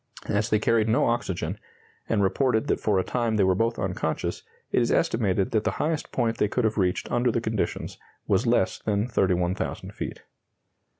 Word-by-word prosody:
As 105 Hz, +2 st, 0 dB
they 105 Hz, -, +3 dB
carried 110 Hz, +1 st, +2 dB
no 115 Hz, -, +3 dB
oxygen, 115 Hz, -6 st, -1 dB, 0.5 s
and 105 Hz, -3 st, +2 dB
reported 110 Hz, +3 st, +2 dB
that -, -, 0 dB
for 105 Hz, -3 st, +1 dB
a 95 Hz, -, +2 dB
time 120 Hz, 0 st, -1 dB
they 105 Hz, -, +3 dB
were 95 Hz, 0 st, +4 dB
both 115 Hz, +5 st, 0 dB
unconscious, 90 Hz, -4 st, -2 dB, 0.3 s
it -, -, +3 dB
is 120 Hz, -, +1 dB
estimated 100 Hz, -1 st, +1 dB
that 110 Hz, -3 st, +1 dB
the -, -, 0 dB
highest 155 Hz, 0 st, -1 dB
point 115 Hz, -1 st, 0 dB
they 105 Hz, -, +3 dB
could 125 Hz, +4 st, -1 dB
have 110 Hz, -1 st, +1 dB
reached 90 Hz, -1 st, 0 dB
under 120 Hz, +1 st, +2 dB
the 115 Hz, -, 0 dB
conditions 110 Hz, -2 st, -3 dB, 0.3 s
was -, -, +2 dB
less -, -, +2 dB
than 105 Hz, 0 st, 0 dB
31,000 90 Hz, -5 st, 0 dB
feet. -, -, -6 dB
110 Hz, 185 wpm, -26 LUFS, 95-115 Hz, 0.5 s, were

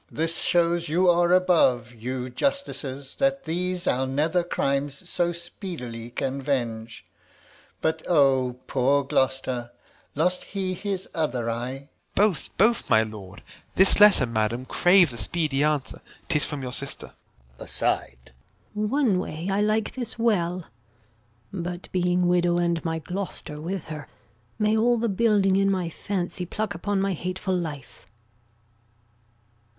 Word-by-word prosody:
Alb. -, -, -18 dB
This 165 Hz, +1 st, 0 dB
shows 170 Hz, -1 st, +2 dB
you 180 Hz, +4 st, +3 dB
are 175 Hz, 0 st, +3 dB
above, 160 Hz, -10 st, +3 dB
You 125 Hz, +2 st, -4 dB
justicers, 140 Hz, -, -3 dB
that 275 Hz, 0 st, +1 dB
these 180 Hz, +2 st, -2 dB
our 130 Hz, +1 st, +1 dB
nether 155 Hz, +6 st, +1 dB
crimes 140 Hz, 0 st, -1 dB
So 175 Hz, -1 st, +1 dB
speedily 170 Hz, -, -7 dB
can 135 Hz, +2 st, -3 dB
venge! 115 Hz, -5 st, -3 dB, 0.8 s
But 160 Hz, 0 st, 0 dB
O 135 Hz, -6 st, +3 dB
poor 140 Hz, +2 st, +2 dB
Gloucester! 130 Hz, -2 st, 0 dB, 0.5 s
Lose 180 Hz, +5 st, +1 dB
he 190 Hz, -2 st, -3 dB
his 195 Hz, 0 st, -4 dB
other 130 Hz, -8 st, -1 dB
eye? 120 Hz, +3 st, -3 dB
Gent. 140 Hz, +2 st, -17 dB, 0.3 s
Both, 200 Hz, -4 st, +2 dB
both, 225 Hz, +5 st, +3 dB
my 110 Hz, -, +5 dB
lord. 105 Hz, -2 st, -9 dB, 0.3 s
This 190 Hz, +2 st, +4 dB
letter, 205 Hz, -10 st, +7 dB
madam, 115 Hz, +2 st, -1 dB
craves 175 Hz, -2 st, +4 dB
a 120 Hz, -, -8 dB
speedy 145 Hz, -, 0 dB
answer. 150 Hz, -3 st, -1 dB, 0.3 s
'Tis 150 Hz, -, +2 dB
from 145 Hz, -3 st, -5 dB
your 125 Hz, -1 st, -4 dB
sister. 140 Hz, +2 st, -5 dB, 0.5 s
Gon. -, -, -8 dB
[aside] -, -, +1 dB, 0.7 s
One 215 Hz, -1 st, +1 dB
way 170 Hz, 0 st, -4 dB
I 200 Hz, +1 st, +1 dB
like 215 Hz, +1 st, +1 dB
this 240 Hz, -4 st, -5 dB
well; 185 Hz, -7 st, +1 dB, 0.9 s
But 175 Hz, -1 st, -5 dB
being 180 Hz, 0 st, +2 dB
widow, 175 Hz, 0 st, +3 dB
and 170 Hz, -1 st, 0 dB
my 165 Hz, -1 st, -1 dB
Gloucester 170 Hz, -3 st, -6 dB
with 175 Hz, 0 st, -4 dB
her, 150 Hz, -3 st, -6 dB, 0.5 s
May 215 Hz, 0 st, +2 dB
all 240 Hz, +2 st, +3 dB
the 230 Hz, 0 st, 0 dB
building 200 Hz, -2 st, +3 dB
in 195 Hz, 0 st, +3 dB
my 185 Hz, -3 st, 0 dB
fancy 180 Hz, 0 st, -3 dB
pluck 210 Hz, +2 st, -3 dB
Upon 200 Hz, +3 st, -1 dB
my 195 Hz, 0 st, +1 dB
hateful 185 Hz, +2 st, -2 dB
life. 150 Hz, -, -6 dB
170 Hz, 140 wpm, -25 LUFS, 135-190 Hz, 0.9 s, letter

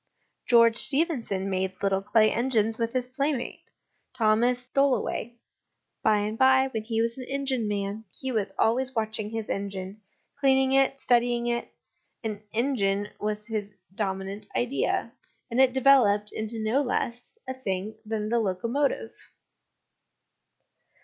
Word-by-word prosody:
George 230 Hz, -1 st, +6 dB
Stephenson 270 Hz, -, 0 dB
made 190 Hz, -1 st, -1 dB
little 195 Hz, -1 st, +2 dB
clay 215 Hz, +2 st, +3 dB
engines 225 Hz, -2 st, +1 dB
with 230 Hz, 0 st, 0 dB
his 250 Hz, -1 st, -1 dB
playmate, 275 Hz, 0 st, -2 dB, 0.5 s
Thomas 240 Hz, +2 st, +2 dB
Tholoway; 265 Hz, -4 st, +1 dB, 0.7 s
by 215 Hz, -1 st, +4 dB
and 210 Hz, +2 st, -2 dB
by, 265 Hz, 0 st, +5 dB
when 220 Hz, -1 st, -2 dB
he 225 Hz, 0 st, 0 dB
was 230 Hz, +2 st, -2 dB
an 255 Hz, -, -6 dB
engineman, 220 Hz, -7 st, -2 dB
he 265 Hz, -1 st, -3 dB
was 215 Hz, -4 st, -1 dB
always 255 Hz, +3 st, +1 dB
watching 220 Hz, -1 st, -2 dB
his 225 Hz, -1 st, -4 dB
engine, 195 Hz, +1 st, -5 dB, 0.4 s
cleaning 265 Hz, -1 st, +3 dB
it, 270 Hz, 0 st, +3 dB
studying 240 Hz, -1 st, +2 dB
it; 235 Hz, 0 st, -2 dB, 0.5 s
an 215 Hz, -2 st, -4 dB
engine 205 Hz, -5 st, 0 dB
was 210 Hz, 0 st, -3 dB
his 210 Hz, -2 st, -4 dB, 0.2 s
dominant 195 Hz, 0 st, -4 dB
idea, 250 Hz, +3 st, 0 dB, 0.4 s
and 245 Hz, +3 st, +3 dB
it 260 Hz, -1 st, +5 dB
developed 240 Hz, -6 st, +4 dB
into 220 Hz, +1 st, -4 dB
no 230 Hz, +6 st, +2 dB
less 245 Hz, -, -3 dB
a 260 Hz, -, -2 dB
thing 205 Hz, -5 st, -3 dB
than 215 Hz, -1 st, -3 dB
the 235 Hz, +1 st, +2 dB
locomotive. 230 Hz, +8 st, -1 dB
230 Hz, 130 wpm, -27 LUFS, 210-260 Hz, 0.7 s, George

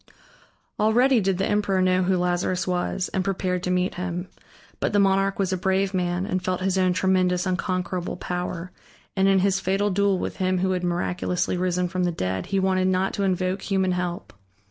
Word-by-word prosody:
Already 240 Hz, +4 st, +4 dB
did 190 Hz, -1 st, 0 dB
the 195 Hz, -, 0 dB
emperor 205 Hz, -2 st, +1 dB
know 185 Hz, 0 st, +3 dB
who 185 Hz, 0 st, +2 dB
Lazarus 180 Hz, +1 st, 0 dB
was, 180 Hz, 0 st, -1 dB
and 190 Hz, -, 0 dB
prepared 185 Hz, -2 st, -1 dB
to 180 Hz, -, -3 dB
meet 180 Hz, +1 st, +1 dB
him. 180 Hz, 0 st, -4 dB, 0.5 s
But -, -, -1 dB
the 205 Hz, -, +4 dB
monarch 195 Hz, 0 st, +2 dB
was 190 Hz, -1 st, 0 dB
a -, -, 0 dB
brave 190 Hz, +2 st, 0 dB
man, 180 Hz, 0 st, -1 dB
and 185 Hz, -3 st, -2 dB
felt 185 Hz, 0 st, -1 dB
his 190 Hz, 0 st, 0 dB
own 185 Hz, -1 st, +2 dB
tremendous, 185 Hz, -1 st, +1 dB
unconquerable 185 Hz, 0 st, -2 dB
power, 180 Hz, 0 st, -4 dB, 0.4 s
and 190 Hz, 0 st, +3 dB
in 195 Hz, 0 st, +4 dB
his 195 Hz, +1 st, +2 dB
fatal 195 Hz, +2 st, 0 dB
duel 200 Hz, 0 st, +2 dB
with -, -, -4 dB
him 185 Hz, -1 st, +1 dB
who 190 Hz, +1 st, +1 dB
had 180 Hz, -1 st, -1 dB
miraculously 180 Hz, +1 st, -1 dB
risen 180 Hz, 0 st, 0 dB
from 180 Hz, +1 st, -2 dB
the 175 Hz, -, +1 dB
dead 95 Hz, -, -3 dB
he 195 Hz, -, 0 dB
wanted 185 Hz, -1 st, +2 dB
not 185 Hz, +1 st, +1 dB
to 200 Hz, -, -1 dB
invoke 185 Hz, 0 st, 0 dB
human 190 Hz, -2 st, 0 dB
help. 180 Hz, -1 st, -3 dB
185 Hz, 195 wpm, -24 LUFS, 180-195 Hz, 0.5 s, Already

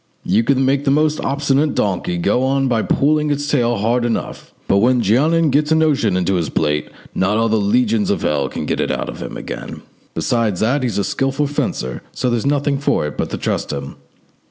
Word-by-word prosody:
You 105 Hz, +5 st, +2 dB
can 135 Hz, +2 st, +2 dB
make 135 Hz, +1 st, +1 dB
the 140 Hz, -, +1 dB
most 155 Hz, +2 st, +2 dB
obstinate 140 Hz, +1 st, 0 dB
donkey 90 Hz, -3 st, -1 dB
go 100 Hz, +8 st, +1 dB
on 135 Hz, +1 st, +1 dB
by 115 Hz, -3 st, +1 dB
pulling 150 Hz, +5 st, +1 dB
its 145 Hz, 0 st, -1 dB
tail 120 Hz, -5 st, +1 dB
hard 115 Hz, +4 st, +1 dB
enough, 120 Hz, -1 st, -3 dB, 0.2 s
but 100 Hz, -, +3 dB
when 120 Hz, +3 st, +3 dB
Jeannin 155 Hz, -, +3 dB
gets 150 Hz, +3 st, +1 dB
a -, -, +5 dB
notion 145 Hz, -11 st, +2 dB
into 95 Hz, +1 st, 0 dB
his 85 Hz, -4 st, -2 dB
pate, 75 Hz, -1 st, -1 dB, 0.2 s
not 95 Hz, +3 st, +1 dB
all 115 Hz, 0 st, +2 dB
the 110 Hz, -, +2 dB
legions 110 Hz, +1 st, +1 dB
of 100 Hz, -, -1 dB
hell 70 Hz, -3 st, 0 dB
can -, -, -5 dB
get -, -, -2 dB
it -, -, -1 dB
out -, -, -4 dB, 0.2 s
again. -, -, -7 dB, 0.3 s
Besides 105 Hz, +3 st, 0 dB
that, 130 Hz, +6 st, +1 dB
he's 125 Hz, -4 st, -2 dB
a 100 Hz, -, +1 dB
skilful 135 Hz, +5 st, -1 dB
fencer, 65 Hz, -, -3 dB
so 125 Hz, -1 st, -1 dB
there's 120 Hz, +2 st, -1 dB
nothing 145 Hz, -1 st, +1 dB
for 140 Hz, -, 0 dB
it 75 Hz, -, -5 dB
but -, -, -2 dB
to -, -, -4 dB
trust -, -, -2 dB
him." 70 Hz, -1 st, -6 dB
125 Hz, 205 wpm, -18 LUFS, 100-140 Hz, 0.3 s, a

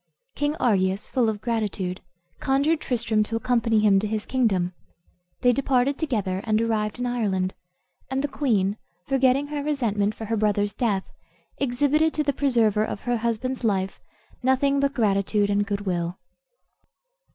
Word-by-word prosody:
King 290 Hz, +1 st, -1 dB
Argius, 195 Hz, -, +1 dB
full 245 Hz, -4 st, +1 dB
of 210 Hz, -1 st, -4 dB
gratitude, 205 Hz, -6 st, -2 dB, 0.4 s
conjured 285 Hz, +4 st, +2 dB
Tristram 225 Hz, -3 st, 0 dB
to 220 Hz, +2 st, -1 dB
accompany 230 Hz, -2 st, +2 dB
him 200 Hz, -2 st, +5 dB
to 210 Hz, -, -2 dB
his 215 Hz, 0 st, -2 dB
kingdom. 195 Hz, -9 st, +1 dB, 0.7 s
They 245 Hz, -1 st, +4 dB
departed 270 Hz, +1 st, +1 dB
together, 205 Hz, -, -1 dB
and 215 Hz, -1 st, +1 dB
arrived 220 Hz, -2 st, 0 dB
in 245 Hz, -, -2 dB
Ireland; 200 Hz, -7 st, 0 dB, 0.6 s
and 265 Hz, +1 st, -1 dB
the -, -, +1 dB
queen, 215 Hz, -9 st, 0 dB, 0.3 s
forgetting 270 Hz, +1 st, +2 dB
her 295 Hz, -1 st, -3 dB
resentment 215 Hz, -8 st, 0 dB
for 220 Hz, -, -6 dB
her 225 Hz, +1 st, -1 dB
brother's 205 Hz, -1 st, +1 dB
death, 205 Hz, -5 st, 0 dB, 0.6 s
exhibited 285 Hz, +4 st, +2 dB
to 305 Hz, -, +1 dB
the 285 Hz, -1 st, 0 dB
preserver 230 Hz, -7 st, +2 dB
of 210 Hz, -, -4 dB
her 245 Hz, -1 st, 0 dB
husband's 235 Hz, +3 st, -2 dB
life 195 Hz, -3 st, 0 dB, 0.4 s
nothing 265 Hz, +2 st, +2 dB
but 280 Hz, 0 st, 0 dB
gratitude 205 Hz, -2 st, +1 dB
and 205 Hz, 0 st, +1 dB
good 200 Hz, -1 st, -2 dB
will. 175 Hz, -2 st, -2 dB
225 Hz, 150 wpm, -25 LUFS, 205-265 Hz, 0.7 s, him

